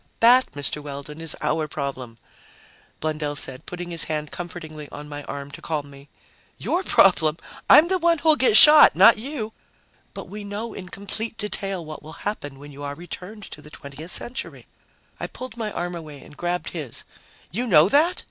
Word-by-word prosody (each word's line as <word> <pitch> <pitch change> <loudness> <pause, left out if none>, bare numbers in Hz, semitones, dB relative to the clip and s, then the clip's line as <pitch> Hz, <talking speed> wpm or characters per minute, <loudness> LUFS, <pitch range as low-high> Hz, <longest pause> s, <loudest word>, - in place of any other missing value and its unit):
"That, 245 +3 +6
Mr. 145 +1 0
Weldon, 145 +2 -8
is 165 -2 -3
our 155 +1 0
problem," 130 -5 -5 0.8
Blundell 150 -1 -2
said, 130 -2 -1
putting 175 0 -6
his 165 -2 0
hand 150 -1 -3
comfortingly 160 -4 -7
on 150 +1 -9
my 145 0 -7
arm 140 0 -7
to - - -10
calm 150 -3 -4
me. 140 +1 -15 0.5
"Your 355 - -1
problem? 165 - +4 0.3
I'm 315 - +8
the 375 +1 +1
one 335 0 +3
who'll 315 0 +4
get 255 -6 +5
shot, 305 0 +9
not 230 -1 +7
you!" 230 -3 -5 0.6
"But - - -7
we 210 0 -8
know 205 +3 -5
in 185 -1 -9
complete 215 +4 -5
detail 195 -4 -3
what 155 0 -8
will 155 +1 -11
happen 145 -10 -4
when 145 +1 -12
you 140 +1 -11
are 145 0 -5
returned 180 +5 -9
to 150 - -9
the 150 - -13
20th 145 +3 -10
Century." 245 +7 -4 0.5
I - - -3
pulled 255 -3 -9
my 220 -3 -4
arm 175 -1 -4
away 155 -4 -9
and 150 - -15
grabbed 175 +2 -2
his. 150 -9 -3 0.5
"You 240 +9 -2
know 165 -5 +6
that? 315 - +3
170 Hz, 185 wpm, -23 LUFS, 145-215 Hz, 0.8 s, shot